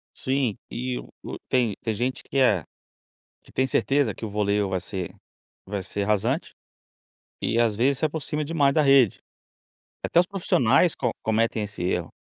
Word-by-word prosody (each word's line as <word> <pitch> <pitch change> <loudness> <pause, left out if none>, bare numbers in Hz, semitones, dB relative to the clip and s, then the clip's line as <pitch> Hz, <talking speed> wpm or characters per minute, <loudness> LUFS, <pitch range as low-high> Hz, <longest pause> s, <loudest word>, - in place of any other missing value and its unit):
Sim, 130 -5 0
e 125 +1 -3
o - - -9
tem 120 -5 +2
tem 110 -2 -2
gente 125 +3 -2
que 140 - -5
é 105 - +4 0.8
que - - -19
tem 130 0 +1
certeza 135 -7 +2
que - - -6
o - - -5
voleio 105 0 +1
vai 95 - 0
ser 95 -3 -5 0.5
vai 100 0 -4
ser 100 +2 -2
rasante, 110 - 0 0.9
e 115 - +1
às 115 -3 +2
vezes 130 +4 +2
se 155 - +1
aproxima 150 0 -2
demais 145 -3 +2
da 155 - +4
rede. 135 -7 +5 0.9
Até 170 - +4
os 180 - +1
profissionais 175 - +3
co - - -1
cometem 110 0 +1
esse 105 -3 -6
erro. 90 -1 -1
120 Hz, 165 wpm, -25 LUFS, 105-140 Hz, 0.9 s, rede